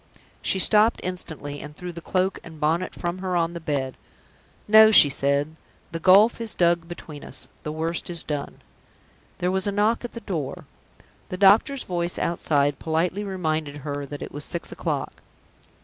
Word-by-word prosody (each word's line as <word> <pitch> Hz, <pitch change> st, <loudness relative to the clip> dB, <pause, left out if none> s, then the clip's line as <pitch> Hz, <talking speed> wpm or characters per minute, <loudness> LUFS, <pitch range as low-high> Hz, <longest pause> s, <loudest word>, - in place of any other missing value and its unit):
She -, -, 0 dB
stopped 215 Hz, +4 st, +4 dB
instantly, 155 Hz, -6 st, -3 dB
and 150 Hz, 0 st, -10 dB
threw 180 Hz, +1 st, -7 dB
the 170 Hz, -, -8 dB
cloak 185 Hz, +2 st, -1 dB
and 160 Hz, -2 st, -12 dB
bonnet 165 Hz, +4 st, 0 dB
from 175 Hz, +1 st, -4 dB
her 185 Hz, -1 st, -2 dB
on 170 Hz, 0 st, 0 dB
the 170 Hz, -, -6 dB
bed. 140 Hz, -5 st, -3 dB, 0.7 s
"No!" 220 Hz, +1 st, +8 dB
she 180 Hz, -9 st, +9 dB
said; 140 Hz, +3 st, 0 dB, 0.4 s
"the 165 Hz, -, -4 dB
gulf 200 Hz, +7 st, +5 dB
is 225 Hz, -1 st, -4 dB
dug 170 Hz, -1 st, +2 dB
between 155 Hz, -4 st, -9 dB
us -, -, -7 dB
the 150 Hz, -, -5 dB
worst 165 Hz, +3 st, -2 dB
is 170 Hz, -2 st, -2 dB
done!" 145 Hz, -2 st, -5 dB, 0.7 s
There 180 Hz, +1 st, 0 dB
was 190 Hz, +1 st, 0 dB
a -, -, +1 dB
knock 210 Hz, +4 st, +1 dB
at 240 Hz, -, -6 dB
the 235 Hz, -, -7 dB
door. 160 Hz, -, -5 dB, 0.6 s
The 185 Hz, -, -4 dB
doctor's 210 Hz, +8 st, +4 dB
voice 175 Hz, -1 st, -2 dB
outside 145 Hz, -4 st, 0 dB
politely 170 Hz, +5 st, -1 dB
reminded 160 Hz, -7 st, -2 dB
her 145 Hz, -1 st, -4 dB
that 145 Hz, +1 st, -7 dB
it -, -, -8 dB
was 145 Hz, +1 st, -6 dB
six 170 Hz, -, -4 dB
o'clock. -, -, -4 dB
170 Hz, 175 wpm, -24 LUFS, 150-190 Hz, 0.7 s, she